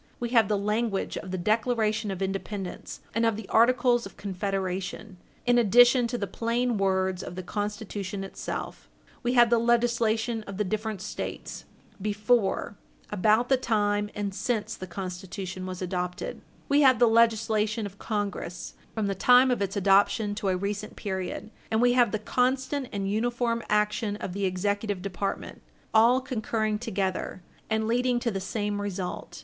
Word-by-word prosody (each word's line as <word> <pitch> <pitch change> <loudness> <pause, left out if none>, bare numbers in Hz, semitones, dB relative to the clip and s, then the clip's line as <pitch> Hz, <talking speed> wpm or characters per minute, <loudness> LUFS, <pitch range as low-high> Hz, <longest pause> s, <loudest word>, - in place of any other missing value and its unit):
We 240 - -2
have 230 -4 +4
the 210 - +1
language 210 0 -1
of 185 - -6
the 185 - -2
Declaration 220 +2 +1
of 195 0 -3
Independence 195 0 -5
and 230 - +1
of 225 -2 +3
the 220 -1 -7
Articles 240 +1 +4
of - - -17
Confederation, 195 0 -3 0.3
in 245 0 +4
addition 245 +2 +6
to 245 +1 -3
the 205 - -2
plain 230 +3 -1
words 190 -1 +1
of 180 - -7
the 185 - -5
Constitution 205 -1 -4
itself; 195 - -6 0.3
we 245 0 0
have 240 -2 +6
the 235 - +5
legislation 235 -1 +1
of 200 -1 -6
the 210 - +1
different 215 0 -3
States, 210 - -6 0.4
before, 210 0 +1 0.4
about 215 +4 +3
the 265 - +4
time, 205 -4 +1
and 205 -1 -2
since 220 +1 -1
the 185 - -8
Constitution 185 0 -6
was 185 0 -5
adopted; 180 -1 -3 0.3
we 285 +1 +4
have 260 -3 +6
the 240 - +5
legislation 225 -1 +2
of 200 0 -9
Congress, 200 -5 -4 0.2
from 220 -2 0
the 200 - 0
time 250 +6 +5
of 245 - 0
its 195 0 -1
adoption 200 +2 +3
to 205 -1 -2
a 185 - +1
recent 200 +2 -4
period; 190 +2 -4 0.2
and 220 - +1
we 245 +1 +4
have 245 -4 +4
the 215 - 0
constant 260 +4 0
and 195 -1 -2
uniform 235 +1 0
action 210 0 +1
of 195 -3 -5
the 200 +1 -1
Executive 200 +1 -1
Department, 195 0 -4 0.3
all 230 +3 +6
concurring 220 -4 -1
together, 190 -5 -3 0.3
and 220 0 0
leading 245 +1 +2
to 235 -1 -1
the 195 -2 -3
same 205 +1 -2
result. 190 -3 -5
210 Hz, 165 wpm, -27 LUFS, 195-235 Hz, 0.4 s, addition